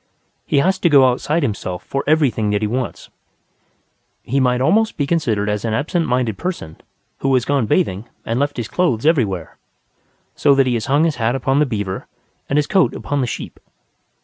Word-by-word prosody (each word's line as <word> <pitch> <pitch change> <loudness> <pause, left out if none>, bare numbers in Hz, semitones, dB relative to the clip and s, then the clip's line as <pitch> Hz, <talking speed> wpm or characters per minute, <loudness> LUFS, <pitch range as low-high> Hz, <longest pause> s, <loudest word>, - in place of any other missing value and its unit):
He - - +1
has 185 +7 +2
to 175 - +3
go 140 -3 +6
outside 145 +6 0
himself 100 -7 -3
for 135 - -3
everything 140 -9 +2
that 105 +1 0
he - - +1
wants. 125 +3 -4 1.1
He 135 +3 0
might 125 -1 +2
almost 215 - +2
be 145 - 0
considered 130 -10 0
as 105 0 -1
an 110 -2 -1
absent 165 +6 -1
minded 125 -4 0
person 165 - -5 0.4
who 135 - 0
had 125 -2 +1
gone 140 -6 +1
bathing 100 +1 0 0.2
and 115 +2 -1
left 145 -1 -1
his 120 -3 -3
clothes 135 -4 0
everywhere, 105 - 0 0.8
so 140 - +3
that 135 -1 +4
he 125 - 0
has 115 +1 -2
hung 145 +3 +3
his 160 -5 0
hat 120 +2 0
upon 135 +2 +1
the 150 - +3
beaver 100 -5 -4 0.4
and 140 - +1
his 150 - +3
coat 190 0 +2
upon 145 -1 -2
the 125 - -1
sheep. - - -6
130 Hz, 195 wpm, -19 LUFS, 110-150 Hz, 1.1 s, go